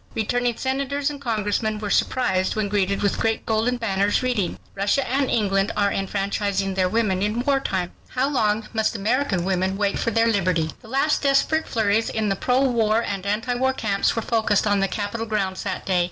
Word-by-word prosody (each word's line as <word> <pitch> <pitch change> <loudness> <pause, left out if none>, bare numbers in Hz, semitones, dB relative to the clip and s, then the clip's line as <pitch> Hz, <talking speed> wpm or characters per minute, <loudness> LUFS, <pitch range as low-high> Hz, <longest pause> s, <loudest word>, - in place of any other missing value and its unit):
Returning 240 +2 0
senators 275 +2 -1
and 285 -1 -9
congressmen 215 -2 -1
were 210 -1 -4
surprised 190 -7 +1
when 215 -2 -1
greeted 200 -1 0
with 200 - +1
great 225 0 0
golden 225 +3 +1
banners 205 -1 +1
reading: 240 -8 -1 0.2
RUSSIA 200 +7 +1
AND 270 +1 0
ENGLAND 195 -3 +1
ARE 200 -1 +2
ENFRANCHISING 195 0 -1
THEIR 185 -1 +1
WOMEN 195 -3 +1
IN 210 +4 0
WAR 275 -1 +3
TIME. 185 -8 -2 0.2
HOW 260 +1 0
LONG 215 -5 0
MUST 220 0 0
AMERICAN 215 -3 0
WOMEN 190 0 0
WAIT 200 -1 0
FOR - - 0
THEIR 230 0 +2
LIBERTY 180 -6 +1
The 230 - -14
last 275 +5 +1
desperate 285 +3 +2
flurries 220 0 +1
in 220 -2 -1
the 195 - +1
pro 250 +6 +1
war 230 -4 +2
and 200 -2 -4
anti 220 +5 0
war 260 +2 +1
camps 205 -6 0
were 225 - -1
focused 220 -3 +1
on 205 -1 +2
the 195 - +2
Capitol 215 +3 -3
grounds 195 -3 -1
that 185 -2 -4
day. 185 -2 +2
215 Hz, 195 wpm, -23 LUFS, 195-245 Hz, 0.2 s, WAR